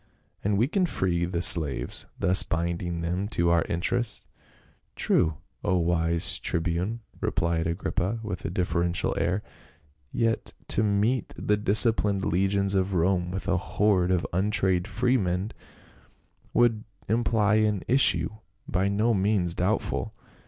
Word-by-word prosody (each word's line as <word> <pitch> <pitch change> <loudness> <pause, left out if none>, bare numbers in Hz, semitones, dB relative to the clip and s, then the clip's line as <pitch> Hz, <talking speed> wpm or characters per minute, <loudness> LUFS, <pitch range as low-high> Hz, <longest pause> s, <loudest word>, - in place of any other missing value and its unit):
and 100 0 0
we 115 +5 +2
can 190 +5 0
free 90 - -1
the 85 0 -2
slaves, 70 -9 +4
thus 90 +1 +5
binding 85 +1 -3
them 90 +4 -2
to 85 -5 0
our 85 -1 +3
interests." 110 +7 -2 0.7
"True, 80 -3 +1 0.3
O 90 - +1
wise 85 -1 +3
tribune," 90 +7 -2 0.2
rephed 85 -1 -1
Agrippa 95 +5 -2
with 105 -5 -5
a - - -3
deferential 85 -1 -1
air. 95 +4 -1 0.4
" 75 - -35 0.2
Yet 115 -1 -1 0.2
to - - +3
meet 105 +4 0
the 105 - 0
disciplined 105 -1 +3
legions 100 +2 0
of 95 0 0
Rome 90 +1 +1
with 95 +2 -5
a 95 -1 +1
horde 95 -1 +1
of 90 -2 0
untrained 95 -1 0
freedmen 105 -4 -1 1.0
would 115 -2 +2 0.2
imply 110 -1 +1
an 105 -4 0
issue 135 +3 +3 0.4
by 90 +3 0
no 105 +4 +1
means 95 -3 0
doubtful. - - -2
95 Hz, 130 wpm, -26 LUFS, 85-105 Hz, 1.0 s, thus